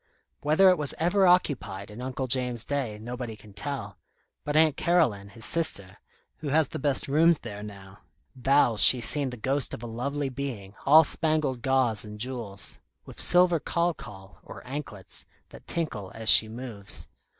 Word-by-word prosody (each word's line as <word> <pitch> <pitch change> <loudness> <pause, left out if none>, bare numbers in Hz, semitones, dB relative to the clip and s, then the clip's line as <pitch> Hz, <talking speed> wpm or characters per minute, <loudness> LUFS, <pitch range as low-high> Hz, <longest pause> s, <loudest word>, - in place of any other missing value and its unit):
Whether 160 +6 +4
it 180 - 0
was 145 -2 0
ever 180 +4 +2
occupied 130 - 0
in 110 +4 -9
Uncle 130 +1 -4
James's 125 -2 +2
day, 135 -7 -3
nobody 120 +1 -7
can 105 -1 -16
tell; 135 +8 -6 0.4
but 145 - -3
Aunt 155 -2 +4
Caroline, 125 - +1
his 115 +2 -4
sister, 100 - 0 0.4
who 155 - -7
has 150 0 +2
the - - -6
best 140 -1 +1
rooms 160 +4 +4
there 105 -3 -8
now, 100 -2 -11 0.4
vows 130 -4 +2
she's 125 -3 +6
seen 135 +3 +1
the 125 - -8
ghost 135 +3 -1
of 110 - -12
a - - -5
lovely 135 +5 -3
being, 125 -8 -6
all 155 +3 +8
spangled 155 -5 0
gauze 130 -5 +1
and 105 -1 -10
jewels, 115 -5 -5 0.3
with - - -3
silver 175 -1 +4
khal 170 +2 -1
khal, 95 0 -12
or - - -12
anklets, 125 -8 -7 0.2
that - - -15
tinkle 125 - -4
as 110 -1 +1
she 110 - +7
moves. 110 -4 -7
130 Hz, 170 wpm, -26 LUFS, 110-150 Hz, 0.4 s, all